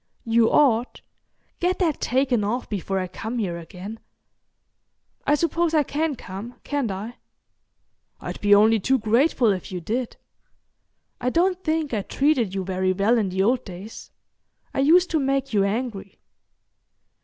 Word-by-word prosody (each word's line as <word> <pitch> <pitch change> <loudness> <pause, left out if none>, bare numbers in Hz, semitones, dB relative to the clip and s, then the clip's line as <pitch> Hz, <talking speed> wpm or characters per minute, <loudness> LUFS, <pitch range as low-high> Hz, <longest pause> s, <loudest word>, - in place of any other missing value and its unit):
"You 230 0 +3
ought. 245 -4 +2 0.6
Get 360 +1 +1
that 330 -6 0
taken 255 -3 +1
off 235 +5 -2
before 195 -1 -3
I 185 - -1
come 220 +6 -5
here 180 -6 -2
again. 190 +6 -9 1.3
I 295 - +5
suppose 335 +1 0
I 300 - +4
can 300 +2 -1
come, 210 +3 -8
can't 285 -5 -1
I?" 205 +5 -6 1.0
"I'd - - -7
be 205 0 +6
only 220 +2 +5
too 265 +7 +2
grateful 235 +1 +2
if 185 -1 -4
you 180 - -3
did. 230 +8 -3 1.0
I 250 - 0
don't 365 +5 +1
think 315 -3 -1
I 210 - 0
treated 250 -4 +1
you 190 - -1
very 185 0 0
well 210 +5 +2
in 205 -3 0
the 190 +1 0
old 245 +4 +2
days. 195 +3 -10 0.6
I - - -2
used 345 +6 +4
to 320 - +2
make 275 -2 -1
you 200 -2 +3
angry." 200 -2 -3
230 Hz, 155 wpm, -24 LUFS, 200-275 Hz, 1.3 s, be